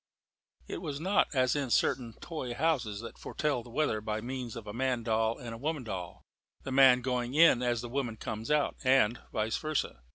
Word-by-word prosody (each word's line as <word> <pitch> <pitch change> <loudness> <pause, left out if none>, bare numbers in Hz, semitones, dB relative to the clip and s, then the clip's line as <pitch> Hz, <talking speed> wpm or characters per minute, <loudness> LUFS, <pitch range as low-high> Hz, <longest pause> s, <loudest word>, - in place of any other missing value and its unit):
It - - -5
was 145 -5 -4
not 190 +5 +2
as 130 0 +3
in 140 -3 -1
certain 115 +1 +1
toy 130 -8 -5
houses 125 -10 0
that 115 - -9
foretell 145 -5 -1
the 120 - -13
weather 115 -4 0
by 110 0 -2
means 125 0 -5
of 115 -3 -7
a 105 - -7
man 125 0 0
doll 110 0 +1
and 120 -2 -7
a 115 - -8
woman 150 0 -2
doll 95 -6 -6 0.4
the 135 - -5
man 130 -2 +6
going 125 0 -2
in 160 -6 +6
as 120 -2 0
the 120 - -6
woman 120 -3 -3
comes 110 +1 -5
out, 150 -1 +1
and 130 -3 +4
vice 110 +1 -1
versa. 155 - -2
125 Hz, 200 wpm, -31 LUFS, 115-140 Hz, 0.4 s, man